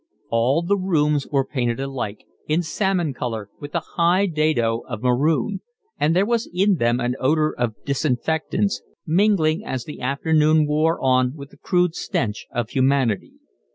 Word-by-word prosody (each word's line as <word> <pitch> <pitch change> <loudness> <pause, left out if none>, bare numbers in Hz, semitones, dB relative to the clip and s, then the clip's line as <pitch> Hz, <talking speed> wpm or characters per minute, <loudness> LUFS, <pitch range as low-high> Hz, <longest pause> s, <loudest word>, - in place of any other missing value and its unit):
All 125 +8 +2
the 200 +4 +1
rooms 150 -6 +1
were 135 -2 +1
painted 120 -4 -2
alike, 135 -6 -4 0.2
in 160 +3 +1
salmon 175 -3 0
colour 110 -5 -5
with 145 +2 -8
a 170 - +1
high 175 +3 +3
dado 155 - +1
of 120 -2 -5
maroon; 150 - +1 0.4
and 155 +3 +2
there 190 +2 +3
was 235 0 0
in 190 +2 +2
them 120 -1 +1
an 125 0 -1
odour 155 +3 +2
of 120 -3 -1
disinfectants, 160 - 0 0.2
mingling 175 -1 +2
as 130 - -4
the 150 - -9
afternoon 155 +3 +2
wore 155 +2 +1
on 130 0 +2
with 140 -2 -10
the - - -18
crude 180 +1 +1
stench 105 -10 -3
of 120 -1 -3
humanity. 130 -5 +1
150 Hz, 155 wpm, -22 LUFS, 125-170 Hz, 0.4 s, high